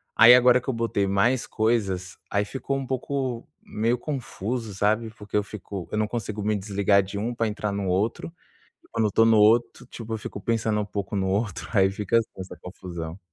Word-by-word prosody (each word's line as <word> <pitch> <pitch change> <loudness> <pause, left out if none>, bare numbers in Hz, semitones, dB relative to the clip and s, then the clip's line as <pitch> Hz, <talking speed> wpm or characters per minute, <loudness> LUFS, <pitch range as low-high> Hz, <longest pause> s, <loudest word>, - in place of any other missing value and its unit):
Aí, 115 +2 +9
agora 125 0 +5
que - - -18
eu - - +1
botei 115 -4 0
mais 100 +6 +2
coisas 100 -5 -1
aí 100 0 +1
ficou 135 +5 -3
um 135 - -4
pouco, 130 -2 -3
meio 115 +3 -1
confuso, 120 -5 -4
sabe? 110 +3 +1
Porque 105 -2 -9
eu 105 - +2
fico 100 -3 -8
eu - - -2
não 110 0 +1
consigo 110 -2 -4
me 105 +1 +1
desligar 100 0 +2
de 100 +2 -7
um 115 +4 -2
pra 115 -1 0
entrar 105 -1 -3
no 100 -1 -2
outro. 100 - -1 0.6
Quando 115 -1 +1
eu - - +2
estou 115 +3 +4
no 115 -1 +5
outro, 115 +3 +3
tipo, 115 -3 -7
eu - - -1
fico 105 - -7
pensando 110 -1 0
pouco 100 0 -4
no 95 -1 0
outro. 100 0 -2
Aí 95 -2 +4
fica 105 +3 0
assim 115 - 0
essa 95 0 -8
confusão. 85 -2 -7
105 Hz, 205 wpm, -25 LUFS, 100-115 Hz, 0.6 s, Aí